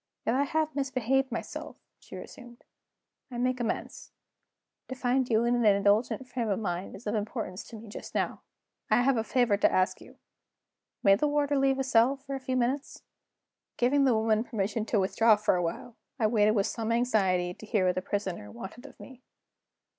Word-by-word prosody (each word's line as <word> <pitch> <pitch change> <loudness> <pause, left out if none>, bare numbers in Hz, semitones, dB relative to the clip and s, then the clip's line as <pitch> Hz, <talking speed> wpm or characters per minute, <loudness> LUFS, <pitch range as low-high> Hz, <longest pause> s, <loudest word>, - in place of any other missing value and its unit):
"If 225 - +1
I 275 +3 +2
have 310 0 -1
misbehaved 270 -1 0
myself," - - -6 0.2
she - - -12
resumed, 240 -2 -11 0.7
"I 245 - -7
make 250 +1 0
amends. 235 - -4 0.8
To 260 - -6
find 250 0 0
you 225 0 +3
in 240 - +2
an 240 -1 +1
indulgent 205 +5 +2
frame 240 -3 -3
of 200 - +1
mind 180 -3 -4
is 205 - -13
of 210 - -1
importance 210 -3 -4
to 235 - -11
me 220 +1 -10
just 205 - -9
now. - - -1 0.5
I 245 - +4
have 270 +1 +3
a 225 - 0
favor 240 -4 +2
to - - +3
ask 185 +2 +1
of - - -12
you. - - -17 0.9
May 195 - +7
the 295 +10 +2
warder 290 0 +1
leave 270 -1 +2
the 270 - 0
cell 255 +1 +3
for 275 0 -8
a 270 - -3
few 260 -1 -2
minutes?" 255 +3 -2 0.7
Giving 275 +3 +3
the 255 -4 +4
woman 220 0 +2
permission 215 -1 -2
to 225 - +1
withdraw 215 +3 +4
for 210 -2 +1
a 180 - 0
while, 175 +7 -5 0.2
I 230 - +1
waited 215 -1 +3
with 200 -2 +2
some 225 -1 -3
anxiety 195 -7 +1
to 220 - -12
hear 205 -3 +1
what 180 - +3
the 185 - -2
Prisoner 190 - -4
wanted 200 - -9
of - - -17
me. 260 -2 -12
230 Hz, 200 wpm, -29 LUFS, 205-260 Hz, 0.9 s, May